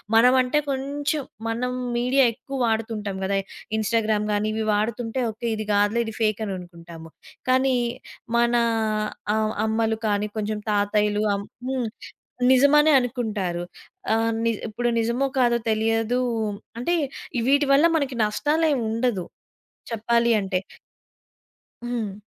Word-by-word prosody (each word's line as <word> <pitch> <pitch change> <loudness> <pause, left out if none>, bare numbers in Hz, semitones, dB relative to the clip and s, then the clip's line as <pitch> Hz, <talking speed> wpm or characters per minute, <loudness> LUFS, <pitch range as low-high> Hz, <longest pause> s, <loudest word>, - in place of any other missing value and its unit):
మనం 250 +3 +6
అంటే, 255 +4 +1
కొంచెం 285 +2 -1 0.3
మనం 250 +2 -1 0.3
మీడియా 255 +3 +3
ఎక్కువ 275 +4 -7
వాడుతుంటాం 220 -3 -2
కదా! 195 +1 0 0.4
ఇన్‌స్టాగ్రామ్ 215 -1 +1
గాని 205 +1 0
ఇవి 220 0 -1
వాడుతుంటే 225 +3 -1
ఒకే 220 +2 -5
ఇది 215 - -3
గాదులే 205 +3 +2
ఇది 220 - -5
ఫేక్ 215 -1 +1
అని 195 - -3
అనుకుంటాము. 170 -2 -11 0.4
కానీ 260 0 +3 0.6
మన 235 0 +3 0.8
ఆహ్, 220 0 0
అమ్మలు 220 0 0
కానీ 205 0 +1
కొంచెం 215 0 -2
తాతయ్యలు 210 0 +1
అం 200 - -2 0.3
హ్మ్ 260 -3 -1 0.6
నిజమనే 295 +4 +6
అనుకుంటారు. 215 -8 -2 0.5
ఆహ్, 225 0 +2
న్ - - +1 0.2
ఇప్పుడు 240 +3 -1
నిజమో 235 +4 +1
కాదో 240 -1 +4
తెలియదు 225 +2 +1 0.6
అంటే 340 +8 0 0.6
వీటి 285 +1 +4
వల్ల 290 +4 +5
మనకి 275 -4 -2
నష్టాలేమి 290 +4 +1
ఉండదు 225 -5 0 0.7
చెప్పాలి 235 +1 +1
అంటే. 190 -1 -1 1.3
హ్మ్. 220 -4 -4
225 Hz, 120 wpm, -24 LUFS, 210-250 Hz, 1.3 s, మనం